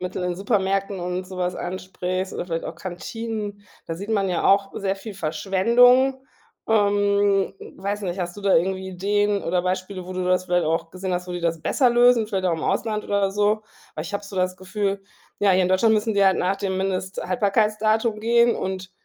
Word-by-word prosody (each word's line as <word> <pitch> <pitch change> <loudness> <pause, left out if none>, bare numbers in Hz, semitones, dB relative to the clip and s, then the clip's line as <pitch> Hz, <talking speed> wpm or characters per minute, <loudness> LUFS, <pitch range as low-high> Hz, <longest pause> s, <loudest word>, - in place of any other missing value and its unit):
mittel 180 0 -4
in 180 -1 -1
Supermärkten 195 -1 0
und 180 +1 -3
sowas 180 -1 -3
ansprichst 185 +1 -4
oder - - -3
vielleicht 165 -2 -3
auch - - -6
Kantinen, 205 +3 -5 0.2
da 165 - -3
sieht 200 +6 -7
man 200 -3 +1
ja 175 - -1
auch 195 0 +4
sehr 195 -1 -1
viel 210 +1 -9
Verschwendung. 235 - +3 0.5
Ähm, 205 -2 +2 0.2
weiß 205 +2 -3
nicht, 180 0 -3
hast 175 +2 -4
du 205 - -9
da 195 - +3
irgendwie 190 +2 +1
Ideen 205 +2 0
oder 175 +1 0
Beispiele, 185 0 -3
wo 185 - -7
du 185 0 -2
das 185 0 +2
vielleicht 175 -2 +1
auch 165 +1 -1
gesehen 185 0 -3
hast, 180 0 -3
wo 180 - -5
die 175 - -4
das 165 -1 -1
besser 255 - +3
lösen, 240 -1 +4
vielleicht 195 -3 -2
auch 180 - +2
im 160 - -3
Ausland 215 -2 -1
oder 200 -1 0
so? 210 +2 +1 0.3
Aber 155 - -4
ich 200 - -7
habe 200 - -2
so 200 -1 -9
das 185 0 0
Gefühl, 195 +1 -2 0.4
ja, 200 -2 +4
hier 185 0 +4
in 180 - +1
Deutschland 220 +4 +4
müssen 215 +1 0
die 200 -1 +2
halt 190 -1 +5
nach 190 +2 0
dem 195 -2 -2
Mindesthaltbarkeitsdatum 210 +4 0
gehen 235 +1 +4
und 185 -1 -4
195 Hz, 200 wpm, -23 LUFS, 185-205 Hz, 0.5 s, halt